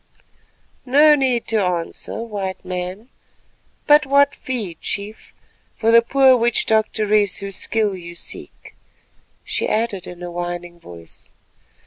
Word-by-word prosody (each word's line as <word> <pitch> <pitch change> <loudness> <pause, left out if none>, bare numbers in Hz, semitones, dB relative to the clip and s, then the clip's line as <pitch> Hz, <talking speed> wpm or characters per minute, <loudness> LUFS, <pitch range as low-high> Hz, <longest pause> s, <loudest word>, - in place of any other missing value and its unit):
No 295 +4 +5
need 260 -5 +1
to 220 -3 +2
answer, 180 +5 -3
White 200 -4 -5
Man, 185 +5 -5 0.8
but 295 -1 +5
what 280 +1 +4
fee, 230 -9 -4
Chief, 210 +2 -5 0.4
for 225 0 +1
the 230 0 +7
poor 265 +2 +4
witch 240 -1 +1
doctoress 215 -2 +1
whose 200 -1 -6
skill 215 -3 0
you 170 -1 -9
seek," - - -9 0.7
she - - -2
added 215 -4 -2
in 180 0 -10
a 175 - -6
whining 175 0 -6
voice. 85 - -14
210 Hz, 125 wpm, -20 LUFS, 180-235 Hz, 0.8 s, the